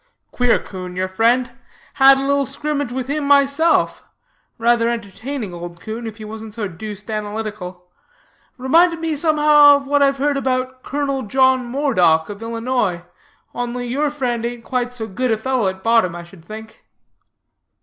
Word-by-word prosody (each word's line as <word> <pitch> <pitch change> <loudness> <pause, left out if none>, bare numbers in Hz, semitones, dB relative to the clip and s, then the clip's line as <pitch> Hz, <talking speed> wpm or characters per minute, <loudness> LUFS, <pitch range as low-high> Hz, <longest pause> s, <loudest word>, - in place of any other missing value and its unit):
"Queer 245 -1 +2
'coon, 185 -2 -8
your 185 +1 -1
friend. 230 +6 +1 0.4
Had 270 0 +6
a 270 - -2
little 280 -1 +1
skrimmage 285 -2 -2
with 255 0 -3
him 295 +2 -2
myself. 280 +3 +3 0.5
Rather 235 0 +2
entertaining 230 0 -5
old 170 0 -8
'coon, 225 +3 -6
if 220 -1 -8
he 215 - -9
wasn't 220 0 -9
so 215 -3 -3
deuced 210 +4 -8
analytical. 210 -4 -5 0.7
Reminded 330 +6 +3
me 325 -1 -2
somehow 295 -1 +6
of 280 0 -3
what 285 +1 +1
I've 275 -1 +3
heard 285 +1 0
about 255 -1 -2
Colonel 275 -1 -2
John 260 +2 +2
Moredock, 185 - +2
of 205 +1 -8
Illinois, 230 -6 -2 0.5
only 245 0 -4
your 290 +5 0
friend 250 -5 -2
ain't 235 0 -4
quite 250 0 -2
so 240 -3 -5
good 245 +5 -2
a 220 - +2
fellow 250 -1 0
at 190 0 -4
bottom, 225 -7 +2
I 175 - -7
should 170 -1 -16
think." 220 +4 -11
240 Hz, 160 wpm, -19 LUFS, 215-275 Hz, 0.7 s, Had